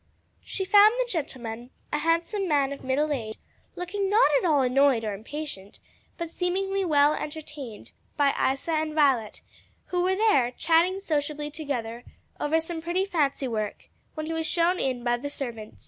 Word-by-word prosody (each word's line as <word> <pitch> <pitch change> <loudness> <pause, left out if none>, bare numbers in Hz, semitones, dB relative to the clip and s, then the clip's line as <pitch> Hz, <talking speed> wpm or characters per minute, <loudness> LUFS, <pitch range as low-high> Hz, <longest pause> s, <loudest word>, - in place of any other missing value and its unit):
She 380 - -4
found 415 +3 +7
the - - +1
gentleman 250 - -5 0.2
a 295 - +1
handsome 335 +5 0
man 280 -3 +2
of 280 - -10
middle 285 +4 0
age 220 -5 -4 0.4
looking 385 +2 -2
not 415 -6 +5
at - - -3
all 290 -3 +4
annoyed 260 -2 +3
or 210 - -2
impatient, 220 -2 -7 0.4
but 340 - -3
seemingly 385 +3 -1
well 295 -3 +4
entertained 295 -7 -7 0.3
by 285 -2 +4
Isa 270 +5 0
and 310 -1 -1
Violet, 265 -8 +2 0.5
who 355 - +2
were 375 +1 +2
there, 380 - +3
chatting 335 +4 +3
sociably 300 -3 -2
together 245 -6 -4 0.4
over 315 +2 +2
some 325 0 -5
pretty 350 +3 0
fancy 290 -7 0
work, 215 -3 -4 0.3
when 310 0 -4
he 325 - -3
was 325 0 -2
shown 345 +2 +2
in 255 -2 -1
by 240 0 +1
the 285 +4 -5
servant. 235 -7 -6
300 Hz, 165 wpm, -26 LUFS, 260-345 Hz, 0.5 s, found